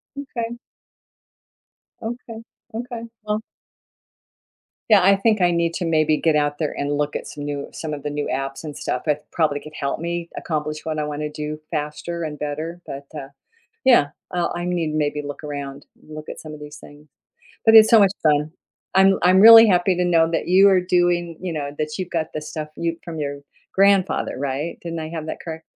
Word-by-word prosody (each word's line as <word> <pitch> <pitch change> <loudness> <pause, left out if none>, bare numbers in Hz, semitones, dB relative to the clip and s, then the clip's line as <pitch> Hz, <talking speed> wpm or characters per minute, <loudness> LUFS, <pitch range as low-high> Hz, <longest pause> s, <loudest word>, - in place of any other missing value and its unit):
Okay. 240 -4 -5 1.4
Okay, 230 0 -6 0.3
okay, 240 0 -5 0.2
well 210 +1 -2 1.5
Yeah, 205 -3 +7
I 195 +1 +5
think 215 -1 +2
I 175 0 +4
need 170 0 0
to 180 - -2
maybe 155 -1 +2
get 160 -2 +2
out 145 0 0
there 155 - -1
and 145 0 -1
look 150 0 -1
at - - -4
some 145 - -8
new 145 -1 -4
some 155 -2 -5
of 145 -1 -6
the 150 - -2
new 145 0 -3
apps 135 +2 -4
and 150 -2 -7
stuff, 125 +5 -3
it 150 0 0
probably 150 -3 +1
could 155 0 -12
help 140 +2 -2
me 170 0 -4
accomplish 150 -1 -3
what 155 -1 -2
I 150 - -1
wanna 150 0 -4
do 150 0 -5
faster 160 +2 -4
and 150 -2 -5
better, 155 +4 -4
but, 140 +1 -7
uh, 135 -1 -7 0.6
yeah, 190 - +5 0.2
I 175 -1 +1
I 175 0 -3
need 170 -3 -1
to 155 - -2
maybe 150 0 -1
look 145 +1 -7
around, 140 -1 -6 0.2
look 155 0 -9
at - - -7
some 155 -1 -9
of 150 - -10
these 150 0 -10
things. 145 +1 -15 0.6
But 225 0 +7
it's 220 0 +9
so 225 - +8
much 195 -2 +5
fun. 150 0 +2 0.4
I'm 195 0 +5
I'm 185 +2 +5
really 225 +1 +10
happy 180 -1 +3
to 180 - +1
know 165 -2 +3
that 165 - -1
you 190 +2 +6
are 185 -2 +4
doing, 175 -2 +1
you 180 -2 -4
know 145 -2 -3
that 150 0 -2
you've 185 -2 -4
got 160 -2 -3
the 155 - -4
stuff 150 0 -6
you 165 0 -2
from 165 -2 -6
your 140 -1 -4 0.3
grandfather, 195 -1 +3
right, 140 +4 -3
didn't 165 -1 -5
I 155 0 -5
have 160 -2 -6
that - - -4
correct? 160 -1 -7
160 Hz, 205 wpm, -22 LUFS, 150-180 Hz, 1.5 s, really